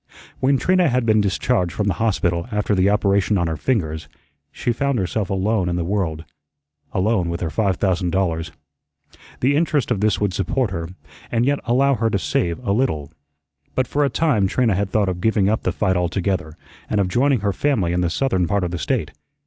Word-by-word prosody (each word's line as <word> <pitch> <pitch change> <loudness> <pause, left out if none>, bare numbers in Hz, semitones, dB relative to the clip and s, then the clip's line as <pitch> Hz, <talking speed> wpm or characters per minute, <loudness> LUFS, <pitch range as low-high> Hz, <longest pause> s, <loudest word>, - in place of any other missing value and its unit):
When 135 +1 +3
Trina 180 +2 +3
had 125 -1 +1
been 110 -1 +4
discharged 100 -1 0
from 105 - -1
the 100 - +1
hospital 90 -5 0
after 105 0 0
the 95 0 +3
operation 100 0 +2
on 85 - +1
her 80 -1 -2
fingers, 80 -7 -2 0.4
she 120 - -1
found 140 +1 0
herself 100 0 -2
alone 95 -1 0
in 85 - -1
the 90 - -1
world, 85 -5 -2 0.7
alone 95 -2 +1
with 85 +1 -3
her 80 -3 -2
five 100 -2 +1
thousand 90 -2 0
dollars. 85 -3 -1 0.9
The 135 +3 +3
interest 150 -5 +1
of 110 - +1
this 105 -2 +2
would 100 -3 0
support 105 +5 -1
her, 85 -2 -4 0.4
and 120 0 +1
yet 145 +1 +1
allow 135 +3 +3
her 115 -3 0
to 100 - 0
save 85 0 -1
a 100 - +1
little. 90 - 0 0.6
But 130 - +2
for 145 +2 0
a 140 - +2
time 125 -9 +2
Trina 115 +1 +1
had 100 +1 -1
thought 105 -1 +1
of 90 -1 -3
giving 105 -2 +2
up 110 +2 +1
the - - 0
fight 95 -3 0
altogether 90 -2 -1 0.3
and 105 - +1
of 100 - +2
joining 125 +4 +2
her 100 -1 0
family 105 -13 0
in 90 - +1
the 90 - +1
southern 95 -4 0
part 100 +2 0
of 90 - -2
the 90 - -4
State. - - -1
100 Hz, 205 wpm, -21 LUFS, 90-120 Hz, 0.9 s, been